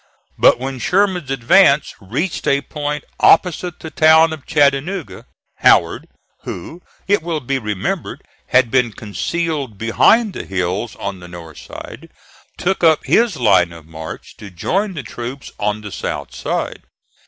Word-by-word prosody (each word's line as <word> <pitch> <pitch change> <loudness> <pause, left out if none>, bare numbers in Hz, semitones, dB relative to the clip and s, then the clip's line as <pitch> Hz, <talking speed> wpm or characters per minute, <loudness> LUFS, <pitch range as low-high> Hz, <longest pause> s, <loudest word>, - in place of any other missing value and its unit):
But - - +5
when 130 +1 -5
Sherman's 180 - +1
advance 140 +3 +4
reached 135 - -3
a 140 0 +3
point 150 -1 -4 0.2
opposite 175 0 +3
the 160 - -7
town 160 +1 +5
of 150 -3 -10
Chattanooga, 145 - 0 0.3
Howard, - - +3 0.3
who, 160 - -8 0.3
it 205 -1 +3
will 165 -1 -2
be 135 0 -2
remembered, 105 -5 -4 0.2
had 130 -3 +3
been 125 -4 +2
concealed 140 +3 -3
behind 195 - +3
the - - -5
hills 95 +4 -2
on 100 -2 -5
the 90 - -11
north 85 -3 -11
side, - - -10 0.5
took 190 0 -1
up 160 -2 +4
his 230 -7 +2
line 95 -8 +3
of 85 -2 -12
march 80 0 -9
to 105 - -10
join 190 - -2
the 145 - -5
troops 120 +4 -7
on 105 +1 -1
the 105 -1 -8
south - - -5
side. - - -3
135 Hz, 145 wpm, -18 LUFS, 105-165 Hz, 0.5 s, But